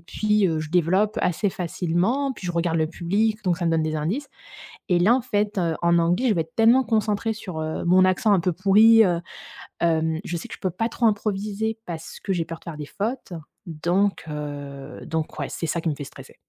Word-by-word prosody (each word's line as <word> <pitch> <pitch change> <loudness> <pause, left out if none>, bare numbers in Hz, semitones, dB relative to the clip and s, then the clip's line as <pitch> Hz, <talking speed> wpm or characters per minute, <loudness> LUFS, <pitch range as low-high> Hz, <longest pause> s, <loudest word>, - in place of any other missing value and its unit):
puis, 210 +4 +1
heu, 160 -3 0
je 155 - -5
développe 185 +5 +2
assez 180 +4 +1
facilement. 185 - -1
Puis 195 - -8
je 175 - -2
regarde 170 -1 0
le 160 -1 +2
public, 205 +6 -1
donc 180 -2 +2
ça 170 - -3
me - - +2
donne 165 -1 +2
des 155 0 -2
indices. 200 - -2 0.6
Et 175 - +3
là, 210 +8 +5
en 260 - 0
fait, 210 -3 -1
heu, 170 -3 +1
en 170 0 +4
anglais, 175 +9 +2
je - - +4
vais 170 - +1
être 160 0 -9
tellement 230 +4 +5
concentrée 220 -1 0
sur, 185 -7 -7
heu, 155 +2 -3
mon 185 +2 +5
accent 185 +3 +3
un 195 - +4
peu 180 - +1
pourri, 215 +5 +6
heu, 175 -2 0 0.6
hem, 160 -1 +1
je 170 - -3
sais 165 - -7
que - - -9
je - - -25
peux 185 - 0
pas 205 +6 -1
trop 235 - -1
improviser 215 +1 -1
parce 165 -2 -7
que 195 - -2
j'ai 170 -3 -1
peur 165 -1 -7
de - - -22
faire 165 -3 -7
des 150 - -5
fautes. 215 - -4 0.3
Donc 175 +5 0
heu, 145 -2 -7
donc 160 -1 -3
ouais, 140 - -3
c'est - - -4
ça 170 +2 -1
qui 165 - -1
me 150 - -2
fait 145 - -7
stresser. - - -13
180 Hz, 235 wpm, -24 LUFS, 165-210 Hz, 0.6 s, pourri